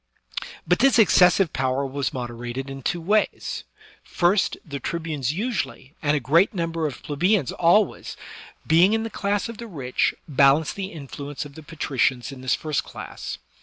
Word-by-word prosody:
But 180 - +3
this 270 0 +5
excessive 185 -4 +5
power 130 +1 0
was 135 +1 -2
moderated 120 +2 -5
in 135 0 -7
two 175 - -1
ways: 205 +6 0 0.4
first, 180 +3 +1
the 140 -4 -5
tribunes 155 -6 -2
usually, 155 - -3
and 150 0 +2
a - - 0
great 165 - +3
number 165 -2 -1
of 140 - -8
plebeians 170 - +1
always, 180 +5 +2 0.5
being 175 +5 +5
in 225 0 +1
the 225 - -5
class 200 +2 -1
of 230 -2 -8
the 235 - -6
rich, 135 - -1
balanced 140 +1 +4
the 195 -1 -4
in 150 -4 -9
fluence 145 +1 -6
of 145 - -11
the 160 - -10
patricians 135 -6 -1
in 135 -2 -10
this 130 0 +1
first 155 -3 -2
class. - - -7
155 Hz, 165 wpm, -24 LUFS, 135-185 Hz, 0.5 s, this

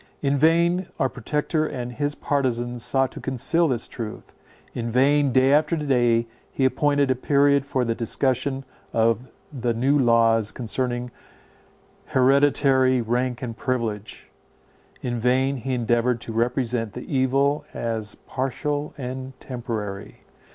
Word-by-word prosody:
In 140 0 +2
vain 170 +4 +3
our 135 - +2
Protector 150 +5 -1
and 125 -2 -5
his 145 +3 -2
partizans 120 -4 -1
sought 135 -1 +2
to - - -9
conceal 155 +6 +1
this 125 -5 -1
truth; 110 -3 -8 0.4
in 120 -1 -3
vain, 140 +3 +3
day 130 +2 +4
after 155 +3 +3
day, 120 -6 +2 0.3
he 135 - 0
appointed 145 0 +2
a - - +2
period 140 +1 +2
for 130 -3 0
the 115 - 0
discussion 130 +3 -1 0.3
of 115 +2 +1 0.3
the 120 -3 -1
new 135 +5 +2
laws 115 -3 +3
concerning 125 0 -3 1.0
hereditary 130 -1 +4
rank 120 +2 -1
and 115 -2 -4
privilege; 115 -5 -4 0.7
in 120 -1 -2
vain 130 +3 +2
he 130 +1 -2
endeavoured 120 0 +1
to 115 - -6
represent 120 -1 -1
the 125 - -6
evil 140 +1 +1
as 110 -2 -3
partial 145 +3 -3
and 130 0 -6
temporary. 110 -6 -6
130 Hz, 130 wpm, -24 LUFS, 120-140 Hz, 1.0 s, day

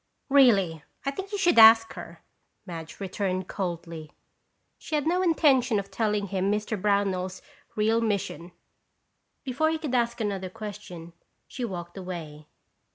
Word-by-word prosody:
"Really, 200 - +4 0.2
I 275 - 0
think 385 +8 -7
you 410 - -2
should 350 -9 +4
ask 225 0 +8
her," - - -10 0.4
Madge 165 -2 -8
returned 185 -1 -3
coldly. 170 -5 -5 0.7
She 310 - -4
had 295 - 0
no 355 +3 +1
intention 280 - +3
of 200 0 -4
telling 210 0 -1
him 195 +1 0
Mr. 210 +1 -1
Brownell's 195 -2 0 0.3
real 220 +2 +2
mission. 200 -5 -2 0.9
Before 275 +3 0
he 320 - 0
could 305 -5 -5
ask 235 -1 +1
another 195 -4 -2
question, 180 -5 -9 0.3
she 250 - -6
walked 175 -5 -6
away. 160 -5 -8
205 Hz, 140 wpm, -26 LUFS, 185-245 Hz, 0.9 s, ask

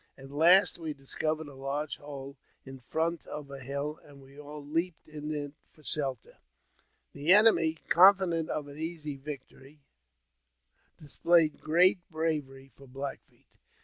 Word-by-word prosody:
At 135 0 -12
last 175 +6 +5
we 160 -3 -5
discovered 155 +3 -3
a 145 - -11
large 140 +3 -4
hole 140 -1 -9 0.3
in 135 0 -10
front 160 +6 -2
of 145 -2 -7
a 140 - -7
hill, 140 +3 -4
and 145 -1 -16
we 135 0 -17
all 150 0 -9
leaped 165 +3 -2
into 150 -1 -4
it 145 - -11 0.2
for 155 - -23
shelter. 135 -6 -3 0.7
The 145 +4 0
enemy, 200 -6 +6
confident 180 -2 +5
of 150 -1 -3
an 145 +1 -11
easy 160 -3 -5
victory, 140 0 -10 1.2
dis 145 -2 -15
played 170 -3 +3
great 180 +4 +4
bravery 150 -5 -3
for 135 - -16
Black 135 +2 -6
Feet. - - -30
150 Hz, 145 wpm, -30 LUFS, 140-160 Hz, 1.2 s, enemy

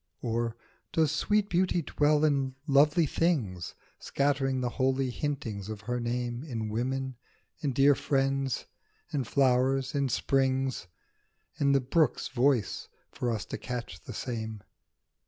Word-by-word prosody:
Or 115 -1 -1 0.4
does 160 -2 +2
sweet 205 +6 +1
Beauty 180 -2 +1
dwell 150 +1 +2
in 135 -3 +1
lovely 150 +3 +4
things 125 - -1 0.2
Scattering 140 -2 0
the 125 - 0
holy 130 0 +2
huntings 120 -8 -3
of 110 -2 -6
her 125 +3 -2
name 120 +1 -2
In 115 -8 -4
women, 130 +3 -2 0.4
in 145 - -1
dear 140 +3 +5
friends, 135 -1 0 0.5
in 140 -4 0
flowers, 130 +1 +2
in 140 -2 +1
springs, 130 -5 +1 0.7
In 140 -1 +3
the 135 - +4
brook's 135 +2 +1
voice, 130 -4 +1 0.2
for 125 - -2
us 110 -3 -2
to - - -6
catch 110 -4 -5
the - - -8
same 110 -4 -4
135 Hz, 135 wpm, -29 LUFS, 120-145 Hz, 0.7 s, dear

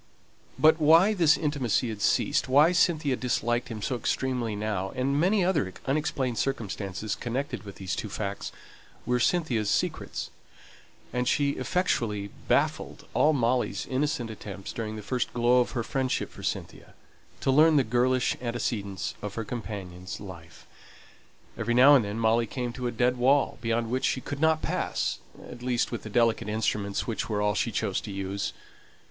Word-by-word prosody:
But 155 +1 +5
why 165 +7 +6
this 170 -6 +4
intimacy 135 -6 0
had 105 -2 -6
ceased, 140 +5 +2
why 145 +6 +6
Cynthia 155 -6 +2
disliked 120 -1 -1
him 110 -3 -6
so 130 - -1
extremely 120 -1 -1
now, 105 -2 -2
and 135 +2 0
many 190 +3 +3
other 150 - +1
unexplained 135 -4 -1
circumstances 105 -5 -3
connected 130 +6 -3
with 100 -2 -10
these 95 -2 -4
two 105 - -4
facts, 100 0 -4 0.5
were 125 +1 +1
Cynthia's 120 - +1
secrets; 100 - -2 0.8
and 125 0 0
she 140 +1 +2
effectually 110 - -1 0.2
baffled - - 0
all 155 - +4
Molly's 125 -3 0
innocent 130 -3 -1
attempts 100 -2 -8
during 110 -1 -4
the 105 - -7
first 125 +3 -2
glow 120 +1 +4
of 125 - 0
her 120 -3 -1
friendship 130 0 -1
for - - -12
Cynthia, - - -5 0.5
to 135 - +2
learn 155 +3 +6
the 140 - +5
girlish 125 +2 +1
antecedents 115 -5 -3
of 105 -1 -5
her 115 - -3
companion's 100 -5 -6
life. 90 -5 -11 0.9
Every 120 +1 -1
now 135 +4 +8
and 135 -5 +6
then 100 +1 -4
Molly 115 +1 +2
came 120 +1 -4
to 125 -1 -3
a - - -1
dead 125 +2 +1
wall, 135 +3 +2
beyond 115 0 -1
which 130 +1 0
she - - +1
could 140 +2 -6
not 160 0 +3
pass - - -1 0.3
at 120 - -10
least 125 -1 0
with 120 - -4
the 110 - -8
delicate 115 -1 +2
instruments 105 -2 -1
which 115 -1 -3
were 105 -2 0
all 105 0 +2
she - - 0
chose - - -1
to - - -7
use. 100 0 -3
120 Hz, 165 wpm, -27 LUFS, 105-135 Hz, 0.9 s, now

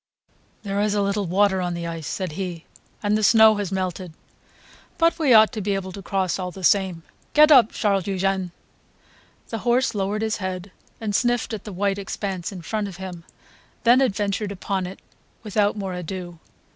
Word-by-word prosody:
"There 200 -1 -1
is 210 0 +1
a 205 - +2
little 200 -1 -1
water 190 +1 +2
on 175 -1 -2
the 170 0 -4
ice," 165 -2 -5
said 185 -3 -3
he, 175 0 -5 0.4
"and 205 0 +2
the 215 - +1
snow 220 0 +6
has 200 -2 -3
melted; 185 -2 -3 0.8
but 335 0 +2
we 295 -5 +2
ought 220 -2 +7
to 220 -4 -4
be 200 0 0
able 190 -1 -4
to 195 - -8
cross 190 -1 -1
all 180 -1 -3
the 185 +1 -10
same. 185 -3 +2 0.3
Get 305 +1 +7
up, 250 -6 +7
Charles 200 -4 0
Eugene." 190 -1 -1 1.0
The 225 - -4
horse 245 +3 +1
lowered 205 +1 -1
his 220 -1 -1
head 185 -1 -5 0.3
and 215 -2 -3
sniffed 240 +1 +1
at 215 - -6
the 210 - -6
white 200 +1 -1
expanse 195 -2 -4
in 180 -3 -8
front 210 +3 -2
of 190 - -9
him, 180 -3 -8 0.6
then 245 +3 +6
adventured 205 -3 0
upon 190 -1 -3
it 185 - -9 0.5
without 210 -1 +1
more 195 -2 -4
ado. 180 -1 -6
195 Hz, 185 wpm, -23 LUFS, 185-215 Hz, 1.0 s, ought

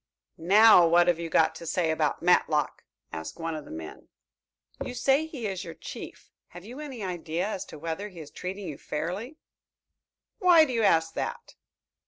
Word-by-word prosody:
"Now, 195 +1 +7
what 175 +1 +4
have 175 -2 +2
you 170 -1 -4
got 160 0 +3
to 165 +1 -9
say 170 -2 +1
about 155 -1 -1
Matlock?" 155 -4 +2 0.3
asked 80 0 -6
one 165 0 -3
of 155 -2 -6
the - - -13
men. 80 -1 -9 0.8
"You 250 - -6
say 275 +5 +2
he 275 -8 -7
is 195 -2 -3
your 165 -3 -8
chief. - - -10 0.2
Have 175 +1 -12
you 245 +6 -9
any 270 -7 -7
idea 175 0 -3
as 205 -3 -4
to - - -11
whether 165 +6 -5
he 180 -4 -13
is 150 -2 -10
treating 190 +1 -6
you 150 -4 -7
fairly?" 185 - -5 1.0
"Why 345 -4 +6
do 260 - -4
you 230 - +1
ask 165 -5 +3
that?" - - -5
175 Hz, 185 wpm, -27 LUFS, 160-220 Hz, 1.0 s, Now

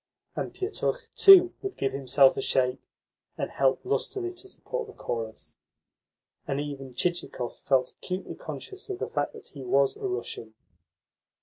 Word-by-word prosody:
And - - -3
Pietukh, 425 +5 -3
too, 370 -3 +9
would 390 -1 -5
give 135 -1 0
himself 135 0 +5
a - - -2
shake, 125 0 +1 0.6
and - - -3
help 135 -1 +2
lustily 375 -2 -1
to 360 +2 -12
support 485 +3 -5
the 420 - -11
chorus; 115 - -5 0.9
and 140 -1 -1
even 135 -3 -6
Chichikov 175 -8 -2
felt 130 -2 +2
acutely 185 +1 -5
conscious 390 +1 -8
of 390 - -3
the - - -3
fact - - -1
that 445 -2 -11
he 140 -3 -9
was 135 +2 +3
a 400 - -3
Russian. 115 - -4
145 Hz, 150 wpm, -28 LUFS, -, 0.9 s, too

